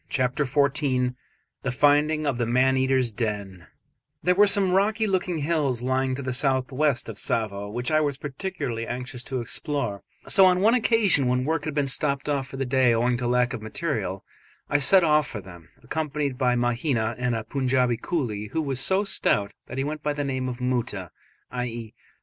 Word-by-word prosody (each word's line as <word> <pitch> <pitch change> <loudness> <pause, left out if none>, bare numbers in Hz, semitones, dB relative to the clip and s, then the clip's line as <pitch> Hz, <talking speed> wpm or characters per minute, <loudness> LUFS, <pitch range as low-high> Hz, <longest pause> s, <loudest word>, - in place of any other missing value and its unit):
CHAPTER 130 +2 0
XIV 135 -2 +1 0.5
THE 135 - -2
FINDING 150 +4 +2
OF 135 -4 -1
THE 120 - 0
MAN 130 +2 +3
EATERS' 130 -3 +1
DEN 100 -6 -4 0.6
There 180 +3 +4
were 205 +3 +5
some 200 -2 +5
rocky 210 +4 +2
looking 185 -3 -1
hills 140 -6 0
lying 130 0 0
to 140 - -6
the 130 0 -2
south 130 0 +1
west 140 -2 0
of 110 -3 -7
Tsavo 100 -3 -2
which 120 +6 -3
I 155 0 +3
was 145 -3 -1
particularly 140 -6 -4
anxious 125 0 -4
to 130 -3 -3
explore, 120 -4 -3 0.3
so 190 -1 +6
on 180 0 +3
one 215 +4 +4
occasion 220 - +3
when 125 +1 +1
work 155 0 -1
had 155 -2 -4
been 145 -2 +1
stopped 140 +1 +1
for 135 -2 -2
the 135 - -1
day 125 -2 +3
owing 120 +2 +1
to 120 0 -2
lack 125 0 +2
of - - -5
material, 110 - -3 0.5
I 145 - +3
set 185 +6 +6
off 150 -2 +3
for 110 - -6
them, 90 -4 -13
accompanied 150 -3 -2
by 125 -1 +1
Mahina 120 -1 0
and 125 -1 0
a 110 - -3
Punjaubi 130 -2 0
coolie, 110 -11 -3
who 160 - -1
was 135 -3 -1
so 190 +8 +2
stout 105 - 0
that - - -7
he 135 - 0
went 150 +1 -4
by 150 -1 -1
the 145 0 -3
name 130 -2 -2
of 125 - -5
Moota 120 - -2 0.4
(i.e. 120 -3 -5
130 Hz, 190 wpm, -25 LUFS, 120-150 Hz, 0.6 s, so